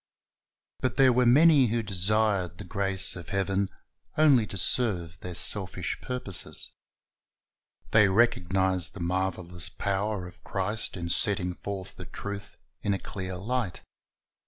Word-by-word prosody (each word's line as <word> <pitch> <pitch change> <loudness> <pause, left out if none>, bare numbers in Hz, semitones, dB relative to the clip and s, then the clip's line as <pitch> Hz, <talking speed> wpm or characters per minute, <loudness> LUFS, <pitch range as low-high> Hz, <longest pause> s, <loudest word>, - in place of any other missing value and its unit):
But 130 - -1
there 130 -2 +6
were 125 0 +3
many 145 +1 +6
who 115 +1 -1
desired 100 -2 0
the 105 - -8
grace 95 +1 +1
of 90 -2 -9
heaven 95 0 0 0.5
only 140 -8 +5
to 100 - -6
serve 90 -6 +1
their 90 -1 -6
selfish 95 0 0
purposes. 125 -7 0 1.2
They 105 -2 +6
recognized 95 -4 +1
the - - -8
marvelous 90 0 -2
power 100 -1 -2
of 90 - -16
Christ 100 +2 -3
in 85 -1 -4
setting 90 0 +1
forth 95 0 -7
the - - -8
truth 100 0 -7 0.2
in 100 - 0
a - - -2
clear 95 0 -6
light. 115 0 -3
95 Hz, 135 wpm, -28 LUFS, 90-110 Hz, 1.2 s, there